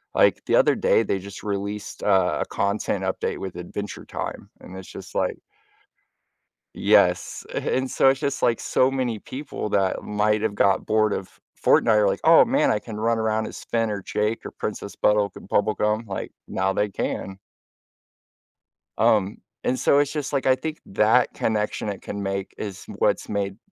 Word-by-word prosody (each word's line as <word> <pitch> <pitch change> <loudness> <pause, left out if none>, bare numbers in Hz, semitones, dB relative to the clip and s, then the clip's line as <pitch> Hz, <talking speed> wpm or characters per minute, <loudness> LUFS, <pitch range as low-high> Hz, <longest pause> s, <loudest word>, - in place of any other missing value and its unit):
Like - - +4
the - - +2
other - - +5
day, 485 -1 +3
they, 95 - -1
just, 95 0 -10
released 100 0 -4
a 95 -6 +3
a - - 0
content 100 +1 -1
update - - -2
with 95 -2 -6
Adventure 100 +4 -6
Time, - - -6
and 95 - -10
it's, 95 - -10
just, - - -10
like - - 0 1.4
Yes, - - +2
and 130 0 -1
so 135 - +4
it's, 135 0 +1
just, 140 - -2
like 115 - +3
so 130 +1 +2
many 125 -4 -1
people 130 -4 -6
that 95 -2 +1
might 105 0 +1
have 110 - 0
got 100 -1 +2
bored 110 -1 +2
of 95 - -6 0.2
Fortnite - - +4
are 105 - +4
like, 95 - 0
"Oh 165 0 +7
man, 270 +5 +2
I 105 - +2
can 105 -1 -8
run 115 +1 +1
around 110 0 0
as - - -9
Finn 115 -1 0
or 100 -1 -3
Jake 105 +4 -2
or - - -6
Princess - - -5
Bonnibel 105 -1 +2 0.2
Bubblegum, 105 +1 +1
like, 95 -1 -5 0.2
now 95 +1 0
they 105 +1 0
can. 95 0 -4 1.6
Um, 110 -2 +2 0.3
and 130 - 0
so 140 +3 +4
it's, 145 -1 +1
just, 145 -2 -4
like, 135 - 0
I 130 -1 +5
think 160 +2 -5
that 110 +5 +3
connection 105 -1 -1
it 100 - -5
can 100 0 -5
make 95 0 -3
is 100 -3 -6
what's - - +1
made 100 -1 -2
105 Hz, 175 wpm, -24 LUFS, 100-120 Hz, 1.6 s, Oh